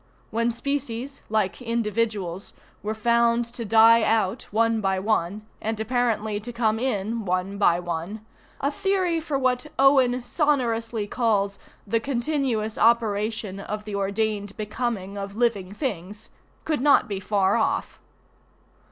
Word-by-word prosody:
When 230 +1 +1
species, 275 +1 -4
like 215 -1 0
individuals, 215 -5 -2 0.3
were 215 +1 -3
found 235 +1 +2
to 240 - -5
die 225 +1 +6
out 220 0 +1
one 225 +1 +2
by 190 -1 +1
one, 205 0 0 0.2
and 220 0 -2
apparently 220 -2 0
to 230 +3 -7
come 225 -2 +1
in 225 -2 -1
one 185 +1 -2
by 175 -4 +4
one, 175 +5 -5 0.3
a 280 - 0
theory 380 -3 +1
for 310 -3 -2
what 255 +1 0
Owen 265 -2 +4
sonorously 240 -6 0
calls 205 -3 0 0.3
"the 230 +3 +1
continuous 240 -4 -1
operation 220 -3 +1
of 210 +1 -5
the 210 - -6
ordained 200 +1 -1
becoming 210 -2 -3
of 200 0 -6
living 215 -5 0
things" 210 - -5 0.4
could 310 -5 0
not 285 -2 +5
be 200 -3 -3
far 195 +1 +2
off. 280 +5 -1
225 Hz, 135 wpm, -25 LUFS, 205-245 Hz, 0.4 s, die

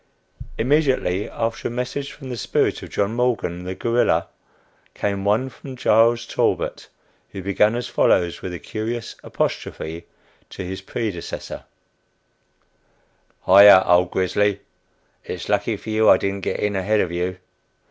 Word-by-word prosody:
Immediately 130 - +1
after 115 0 -3
a - - -4
"message" 125 +4 -4
from 135 -3 -10
the 125 - -4
spirit 115 - 0
of - - -9
John 100 +2 -1
Morgan, 115 -8 -1
the 95 +1 -4
guerrilla, 120 +3 +1 0.7
came 100 -1 -2
one 110 +6 +2
from 130 0 -10
Charles 115 0 +3
Talbot, - - -1 0.4
who 95 - -8
began 105 +3 +2
as 120 0 -3
follows 90 -7 +2
with 95 - -5
a 90 - -5
curious 110 +7 -5
apostrophe 85 +2 -4 0.4
to 95 - -7
his 95 +1 -6
predecessor: 95 -2 -5 1.8
"Hi 100 +2 +7
yah! 95 -2 +9
old 90 0 +4
grisly. 100 +2 0 0.6
It's - - -6
lucky - - 0
for 110 - -7
you 110 0 +4
I - - +8
didn't 100 0 -3
get - - -2
in 105 -1 -1
ahead 105 +3 +1
of 90 - -2
you. 90 +1 -2
105 Hz, 145 wpm, -22 LUFS, 95-120 Hz, 1.8 s, yah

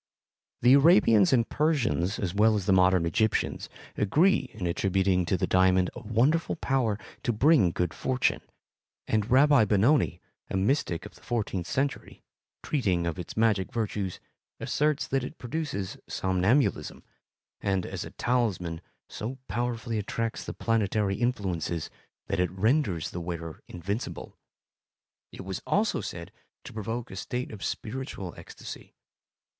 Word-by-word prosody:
The 125 +2 +7
Arabians 135 - +6
and 120 -3 +3
Persians, 125 - +1
as 90 -3 -2
well 110 +2 +4
as 100 -3 -2
the 95 - +3
modern 90 -2 +4
Egyptians, 110 +6 0 0.3
agree 160 - +3
in 100 -4 -6
attributing 95 0 +1
to 95 - +1
the - - 0
diamond 95 0 +3
a - - -8
wonderful 120 +9 +1
power 130 -9 0 0.2
to 125 - 0
bring 125 - +4
good 85 0 -2
fortune, 130 -1 0 0.7
and 110 0 0
Rabbi 140 0 +6
Benoni, 110 +9 +3 0.3
a - - -1
mystic 95 - 0
of - - -10
the - - -19
fourteenth 100 -7 -2
century, 140 +1 -3 0.4
treating 95 - 0
of 85 +1 -3
its 90 - -7
magic 105 -5 +2
virtues, 105 -5 -3 0.4
asserts 150 0 0
that 135 -1 0
it 150 - -7
produces 125 - -4
somnambulism, 95 +9 +1 0.6
and, 95 -2 0
as - - -5
a - - -8
talisman, 95 -9 -1 0.3
so 120 +5 -5
powerfully 120 -2 -2
attracts 115 +3 -3
the - - -5
planetary 105 -3 0
influences 95 -9 -2 0.3
that - - -2
it 90 -1 +2
renders 100 - 0
the 90 - -5
wearer 85 -2 -6
invincible; 100 +6 -5 1.0
it - - -9
was 95 -1 -4
also 210 +1 +1
said 85 +3 -7 0.3
to - - -10
provoke 115 +3 -4
a - - -7
state 125 +7 -4
of 105 -3 -8
spiritual 110 -6 -5
ecstasy. - - -10
105 Hz, 140 wpm, -28 LUFS, 95-125 Hz, 1.0 s, The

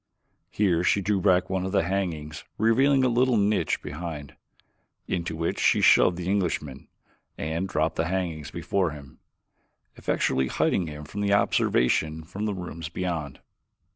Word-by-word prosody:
Here 90 -5 +1
she 100 - +3
drew 100 0 0
back 90 -2 +3
one 95 -1 -2
of 95 - -3
the 95 - +3
hangings, 80 -5 -3
revealing 130 +5 +3
a - - +4
little 125 0 +2
niche 105 +1 +1
behind, 75 -2 -6 0.7
into 85 -2 -2
which 80 +1 -2
she - - +3
shoved 90 - +5
the 90 0 -5
Englishman 85 -8 -2 0.5
and 80 +5 -3
dropped 80 -1 0
the 80 - 0
hangings 85 -5 -3
before 95 -3 -1
him, 70 -3 -11 0.8
effectually 65 0 0
hiding 85 +6 0
him 75 -1 -7
from 100 +7 -3
observation 80 -5 +2
from 95 +6 -5
the 105 -2 -1
rooms 85 -3 -6
beyond. 85 -5 -4
90 Hz, 145 wpm, -26 LUFS, 80-100 Hz, 0.8 s, shoved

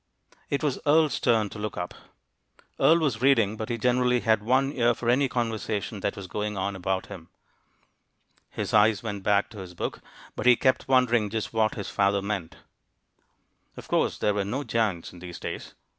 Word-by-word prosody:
It 140 - -1
was 145 -4 0
Earle's 150 -1 +3
turn 110 -4 +2
to 105 - -9
look 105 0 -4
up. 90 0 -4 0.9
Earle 165 - +6
was 140 -9 -1
reading, 115 -6 +3
but 110 0 -5
he 120 - -1
generally 125 +1 +2
had 110 -1 +2
one 130 +5 +2
ear 120 -3 +2
for 120 0 0
any 135 +2 +2
conversation 110 -3 -2
that - - -2
was 100 - -7
going 105 +2 -4
on 100 +1 -2
about 95 0 -2
him. 90 -5 -11 1.2
His - - -4
eyes 105 0 +4
went 105 -3 -4
back 100 +2 +1
to 105 - -10
his 90 -2 -9
book, - - -4 0.3
but - - -2
he 125 - +8
kept 130 +2 +1
wondering 120 -5 +3
just 110 +1 -4
what 110 -1 +1
his 100 - -5
father 100 0 +1
meant. 100 -5 -4 1.2
Of - - -10
course - - +1
there 105 - +1
were 100 -1 0
no 125 +9 -3
giants 110 -9 -1
in 90 - -12
these 90 -1 -8
days! - - -7
110 Hz, 190 wpm, -26 LUFS, 100-125 Hz, 1.2 s, he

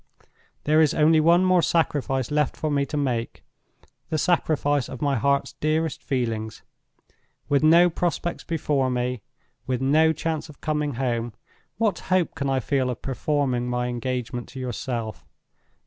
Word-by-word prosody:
"There 155 +2 +4
is 155 -2 +3
only 155 +1 +5
one 170 +4 +4
more 185 -1 +4
sacrifice 145 -7 0
left 150 -1 0
for 155 - -2
me 140 -1 +1
to 150 - -4
make—the 135 +4 -5
sacrifice 145 -5 +1
of 130 - -7
my 140 -1 +1
heart's 140 +4 +1
dearest 155 0 -1
feelings. 115 -4 -3 0.8
With 145 -1 +2
no 165 +3 +6
prospects 175 0 -2
before 145 -5 0
me, 125 -1 -2 0.5
with 130 -2 0
no 155 +5 +4
chance 160 0 -3
of 145 - -14
coming 150 -3 -1
home, 120 -3 -2 0.4
what 215 -2 +1
hope 185 -3 +2
can 140 -1 -2
I 135 -1 +1
feel 130 0 0
of 125 - -5
performing 135 -2 -1
my 125 0 -1
engagement 125 0 -4
to 135 - -9
yourself? 115 - -4
140 Hz, 145 wpm, -24 LUFS, 125-155 Hz, 0.8 s, no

